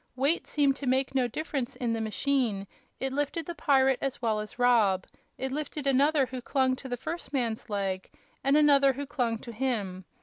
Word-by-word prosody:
Weight 280 +6 +1
seemed 280 -2 +2
to 275 -1 -6
make 260 +1 +1
no 260 -2 +2
difference 275 0 -3
in 235 -2 -1
the 225 - -1
machine; 220 -1 0 0.3
it 265 0 -2
lifted 290 +4 -1
the 345 - -5
pirate 270 -5 +3
as 275 -2 -2
well 220 -3 0
as 210 +2 -7
Rob; 225 -7 +3 0.3
it 265 0 -3
lifted 295 0 -4
another 275 +1 +4
who 255 0 -6
clung 260 0 +1
to 265 - -9
the 245 - -2
first 335 +7 -6
man's 240 -4 -2
leg, 195 -2 -2 0.3
and 275 +2 +4
another 280 -2 +5
who 285 +2 -5
clung 240 -5 -1
to 235 +2 -9
him. 210 -7 -2
260 Hz, 195 wpm, -28 LUFS, 230-280 Hz, 0.3 s, another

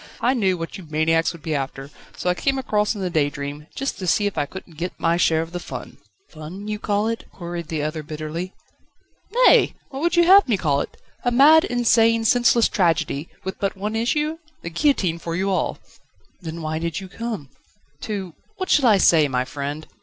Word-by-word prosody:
I 250 - +2
knew 195 -7 +1
what 165 +4 -6
you 175 - -11
maniacs 160 +2 +2
would 170 -3 -13
be 160 - -2
after, 135 0 -4 0.3
so - - -4
I 180 - +4
came 270 +9 0
across 210 -4 0
in 200 - -5
the 180 -2 -2
_Daydream,_just 145 - -3
to 185 - -4
see 205 +4 +3
if 205 - -1
I 145 - -1
couldn't 175 0 -10
get 180 +2 -4
my 165 0 +2
share 160 -2 +2
of 165 - -11
the 175 - -4
fun." - - -8 0.3
"Fun, 170 +6 -9
you 210 0 -3
call 205 0 0
it?" 230 0 -3
queried 170 -2 -6
the 155 -2 -2
other 155 +1 -3
bitterly. 155 +4 -5 0.9
"Nay! - - +5
what 270 0 -6
would 340 +1 +1
you 345 - +6
have 385 +2 +7
me 225 -5 +2
call 145 -5 +1
it? - - -7 0.3
A 245 - +2
mad, 295 +6 +6
insane, 230 -2 +3
senseless 240 0 +4
tragedy, 165 -4 0
with 190 - -5
but 195 -1 -2
one 210 +3 -3
issue? 300 +8 0 0.2
the 170 - -5
guillotine 185 - +1
for 165 0 -4
you 195 +2 0
all." 185 - 0 0.6
"Then 165 -1 -6
why 155 0 -2
did 165 -2 -3
you 190 - -8
come?" 205 - -6 0.5
"To 195 -4 -5 0.2
What 370 -1 -3
shall 275 -4 +5
I 210 - +6
say, 160 -5 +5
my 125 -2 -1
friend?" 145 +3 -5
180 Hz, 205 wpm, -22 LUFS, 160-225 Hz, 0.9 s, have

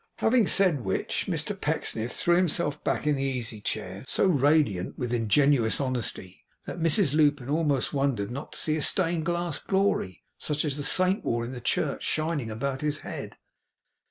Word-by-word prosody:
Having 225 -3 +3
said 175 -10 +3
which, 95 -1 -2
Mr - - -2
Pecksniff 115 +2 -2
threw 175 - +2
himself 170 -4 0
back - - -1
in 150 - +3
the 135 - -3
easy 120 -5 -3
chair; 95 -1 -4
so - - +1
radiant 145 - +2
with 125 -1 -3
ingenuous 120 +1 +2
honesty, 120 -8 -3 0.2
that - - -6
Mrs 165 -1 +3
Lupin 145 -4 +2
almost 150 -4 0
wondered 135 -7 0
not 140 +4 -6
to - - -9
see 155 - +1
a 155 - -2
stained 170 0 +1
glass 175 -2 -1
Glory, 190 - 0 0.2
such 150 +1 -2
as 145 -3 -2
the 145 - -3
Saint 185 +7 +3
wore 115 0 -1
in 120 - -6
the 125 -2 -7
church, - - -1
shining 155 -6 -1
about 130 +5 -3
his 150 -1 -1
head. - - -7
145 Hz, 175 wpm, -27 LUFS, 120-165 Hz, 0.2 s, Having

